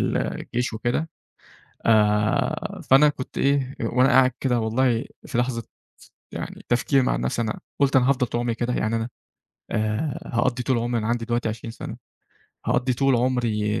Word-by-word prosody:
ال -, -, 0 dB
الجيش 125 Hz, +1 st, -2 dB
وكده، 120 Hz, +8 st, -1 dB, 0.8 s
آآ، 105 Hz, -1 st, +2 dB
فأنا 135 Hz, +3 st, +7 dB
كنت 135 Hz, -3 st, -7 dB
إيه 140 Hz, -1 st, +1 dB
وأنا 125 Hz, +3 st, +3 dB
قاعد 130 Hz, 0 st, +5 dB
كده 125 Hz, -3 st, +1 dB
والله 115 Hz, +1 st, +1 dB, 0.2 s
في -, -, -4 dB
لحظة 120 Hz, -1 st, 0 dB, 0.7 s
يعني -, -, -7 dB
تفكير 130 Hz, +3 st, +3 dB
مع -, -, +1 dB
نفسي 65 Hz, -, -1 dB
أنا 110 Hz, -2 st, -3 dB, 0.2 s
قلت 140 Hz, 0 st, +3 dB
أنا 130 Hz, 0 st, +4 dB
هافضل 130 Hz, -2 st, +2 dB
طول 120 Hz, -, -2 dB
عمري 120 Hz, -1 st, -1 dB
كده 120 Hz, +1 st, -1 dB
يعني 110 Hz, +1 st, 0 dB
أنا؟ 115 Hz, +1 st, -2 dB, 0.6 s
آآ، 110 Hz, +7 st, -1 dB
هاقضّي 125 Hz, +1 st, +1 dB
طول 130 Hz, 0 st, +1 dB
عمري 120 Hz, +1 st, -1 dB
أنا 110 Hz, -, -3 dB
عندي 115 Hz, 0 st, -1 dB
دلوقتي 120 Hz, -1 st, 0 dB
20 115 Hz, +1 st, -6 dB
سنة، -, -, -7 dB, 0.7 s
هاقضّي 125 Hz, +1 st, +2 dB
طول 135 Hz, +1 st, +3 dB
عمري 115 Hz, -4 st, 0 dB
120 Hz, 165 wpm, -24 LUFS, 115-130 Hz, 0.8 s, فأنا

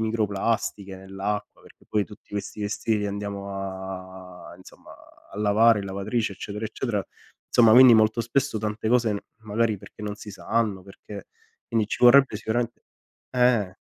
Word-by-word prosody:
microplastiche 105 Hz, -2 st, -1 dB
nell'acqua, 95 Hz, +2 st, -5 dB
perché -, -, -20 dB
poi 105 Hz, -2 st, 0 dB
tutti 105 Hz, -, -16 dB
questi 105 Hz, +1 st, -5 dB
vestiti 110 Hz, +2 st, -1 dB
li 105 Hz, -, -1 dB
andiamo 100 Hz, 0 st, -5 dB
a 95 Hz, -2 st, -8 dB
insomma, 95 Hz, -, -16 dB, 0.4 s
a -, -, -10 dB
lavare 105 Hz, +1 st, +4 dB
in -, -, -6 dB
lavatrice, 100 Hz, +3 st, -2 dB
eccetera 105 Hz, +3 st, -6 dB
eccetera; 110 Hz, -2 st, -3 dB, 0.4 s
insomma, 115 Hz, -2 st, +5 dB
quindi 125 Hz, 0 st, +9 dB
molto 110 Hz, +1 st, +3 dB
spesso, 135 Hz, +2 st, -1 dB
tante 105 Hz, +1 st, -3 dB
cose 120 Hz, -2 st, +3 dB
n 100 Hz, -, -2 dB, 0.2 s
magari 110 Hz, 0 st, 0 dB
perché -, -, -15 dB
non 105 Hz, -1 st, -4 dB
si 105 Hz, 0 st, -10 dB
sanno, 105 Hz, -1 st, -1 dB
perché 100 Hz, +1 st, -11 dB, 0.4 s
quindi 110 Hz, -2 st, +1 dB
ci -, -, -5 dB
vorrebbe 130 Hz, +1 st, +7 dB
sicurame 115 Hz, +2 st, -1 dB, 0.6 s
eh. 125 Hz, -7 st, +2 dB
105 Hz, 150 wpm, -25 LUFS, 100-115 Hz, 0.6 s, quindi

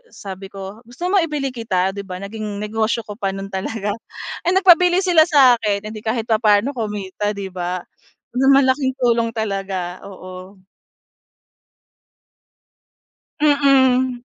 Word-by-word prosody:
sabi 195 Hz, -, -9 dB
ko, 195 Hz, +2 st, -9 dB
"Gusto 255 Hz, +8 st, -8 dB
mo 395 Hz, -, +5 dB
ibili 295 Hz, -5 st, -2 dB
kita?" 195 Hz, -6 st, -1 dB
'Di 200 Hz, -, -6 dB
ba, 190 Hz, -2 st, -7 dB
naging 205 Hz, +2 st, -6 dB
negosyo 220 Hz, +2 st, -1 dB
ko 210 Hz, -, -8 dB
pa 200 Hz, -2 st, -3 dB
no'n 195 Hz, 0 st, -6 dB
talaga. 205 Hz, +2 st, -3 dB, 0.5 s
Eh, 355 Hz, -, 0 dB
nagpabili 360 Hz, 0 st, +5 dB
sila 345 Hz, -3 st, +5 dB
sa 275 Hz, -6 st, +6 dB
akin, 210 Hz, -2 st, -2 dB
eh, 215 Hz, -, -6 dB
'di 215 Hz, -, -8 dB
kahit 220 Hz, +1 st, -2 dB
papaano 220 Hz, +3 st, +2 dB
kumita, 210 Hz, -3 st, -3 dB
'di 195 Hz, -2 st, -6 dB
ba? 180 Hz, 0 st, -4 dB, 0.5 s
Malaking 265 Hz, 0 st, +3 dB
tulong 235 Hz, -2 st, +2 dB
talaga, 195 Hz, -4 st, -3 dB
oo. 185 Hz, 0 st, -11 dB, 2.8 s
Mm. 260 Hz, -4 st, +3 dB
220 Hz, 130 wpm, -20 LUFS, 195-260 Hz, 2.8 s, sa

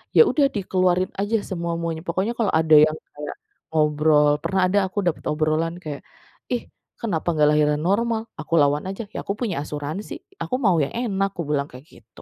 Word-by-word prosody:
ya -, -, +9 dB
udah 290 Hz, -, +3 dB
dikeluarin 185 Hz, -2 st, +1 dB
aja 205 Hz, +3 st, +1 dB
semua-muanya. 170 Hz, -2 st, -3 dB
Pokoknya 190 Hz, +7 st, 0 dB
kalau 225 Hz, -, +2 dB
ada 160 Hz, -1 st, +5 dB
yang 155 Hz, -, -2 dB, 0.2 s
kayak 150 Hz, 0 st, -6 dB, 0.4 s
ngobrol 150 Hz, -1 st, +4 dB
pernah 190 Hz, -1 st, +1 dB
ada 200 Hz, +2 st, +3 dB
aku 190 Hz, -, -16 dB
dapat 165 Hz, -, -1 dB
obrolan 155 Hz, +2 st, 0 dB
kayak, 150 Hz, -3 st, -6 dB, 0.5 s
"Ih 245 Hz, -2 st, 0 dB, 0.4 s
kenapa 180 Hz, -9 st, -2 dB
nggak 150 Hz, -1 st, +4 dB
lahiran 150 Hz, 0 st, +2 dB
normal?" 225 Hz, +2 st, +1 dB, 0.2 s
Aku 155 Hz, +1 st, -6 dB
lawan 145 Hz, +1 st, +2 dB
aja, 195 Hz, +3 st, -5 dB
"Ya -, -, -4 dB
aku 200 Hz, -, -1 dB
punya 220 Hz, -8 st, -1 dB
asuransi. 150 Hz, +7 st, -5 dB, 0.3 s
Aku 255 Hz, -, -2 dB
mau 185 Hz, -4 st, +4 dB
yang 140 Hz, -, -4 dB
enak." 200 Hz, -5 st, 0 dB
aku 175 Hz, -, -3 dB
bilang 140 Hz, -2 st, +1 dB
kayak 130 Hz, +4 st, -12 dB
gitu. 115 Hz, -, -17 dB
170 Hz, 180 wpm, -23 LUFS, 150-195 Hz, 0.5 s, ya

